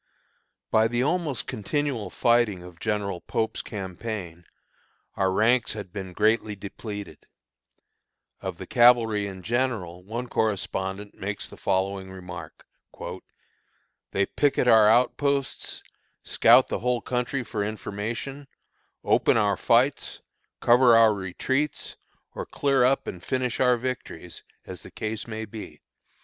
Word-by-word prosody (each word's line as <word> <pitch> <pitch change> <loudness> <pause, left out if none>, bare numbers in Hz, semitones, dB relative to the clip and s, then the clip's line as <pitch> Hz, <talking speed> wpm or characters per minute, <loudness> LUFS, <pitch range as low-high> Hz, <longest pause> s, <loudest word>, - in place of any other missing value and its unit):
By 110 0 +4
the 120 +2 0
almost 150 -5 -1
continual 130 0 -2
fighting 120 -6 +2
of 90 -2 -13
General 105 -4 -2
Pope's 110 -1 -2
campaign, 95 -3 -6 0.7
our 95 -1 +1
ranks 115 +5 +3
had 100 -4 -8
been 95 -3 -6
greatly 110 +1 +2
depleted. 100 +1 -8 1.1
Of - - -5
the - - -7
cavalry 115 -4 +4
in 95 -2 -8
general 110 -8 -1
one 115 +6 -5
correspondent 100 -2 -2
makes 100 +1 -5
the - - -12
following 95 0 -1
remark: 90 -4 -9 1.4
"They 100 - +1
picket 140 0 +1
our 110 -3 +7
outposts, 140 +4 +1 0.4
scout - - +5
the - - -2
whole 125 0 0
country 125 +1 -2
for 110 -3 -3
information, 110 +6 -5 0.6
open - - +3
our 105 -2 +3
fights, 125 +8 +2 0.4
cover 120 0 +6
our 115 -1 +6
retreats, 130 +10 -2 0.4
or - - -6
clear 140 -3 +2
up 130 +2 +3
and 90 -1 -7
finish 130 -2 -1
our 125 -1 +4
victories, 115 -9 -6 0.2
as - - -8
the - - -11
case 110 +1 -5
may 110 -1 -5
be. 110 0 -9
110 Hz, 125 wpm, -26 LUFS, 100-125 Hz, 1.4 s, our